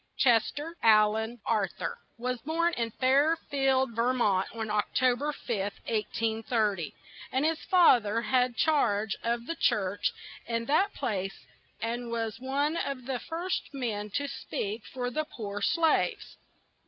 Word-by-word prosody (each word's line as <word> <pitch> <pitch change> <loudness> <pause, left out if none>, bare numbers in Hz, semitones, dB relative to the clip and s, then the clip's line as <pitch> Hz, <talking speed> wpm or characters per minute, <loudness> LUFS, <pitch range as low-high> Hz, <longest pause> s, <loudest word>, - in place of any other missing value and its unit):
Ches 235 -4 +4
ter 310 +3 -6
Al 215 -1 +6
an 220 +2 -3
Ar 215 -4 +2
thur - - -5 0.2
was 250 +1 -2
born 335 +4 +1
in 230 -4 -1
Fair 275 +7 +3 0.2
field, 265 -2 +2
Ver 240 +2 +2
mont, 200 -6 +2
on 220 -2 -4
Oc 210 0 0
to 255 -1 +4
ber 290 +4 -2
5th, 205 -8 -3
1830, 220 -4 -1 0.4
and 265 +3 +1
his 325 0 +1
fath 340 - +6
er 215 +3 -1
had 250 -1 +2
charge 220 -10 +2
of 235 0 -1
the 330 - -2
church 200 - +1 0.4
in 230 0 -1
that 315 - +3
place 195 -7 -3 0.3
and 235 +1 -3
was 225 -1 -3
one 285 +5 0
of 275 -5 -3
the 260 -1 -2
first 345 +6 -3
men 215 -5 -3
to 285 +8 -2
speak 215 -4 -4
for 250 -1 -3
the 310 +5 -1
poor 205 -8 -6
slaves. 335 - +1
240 Hz, 155 wpm, -29 LUFS, 220-280 Hz, 0.4 s, Al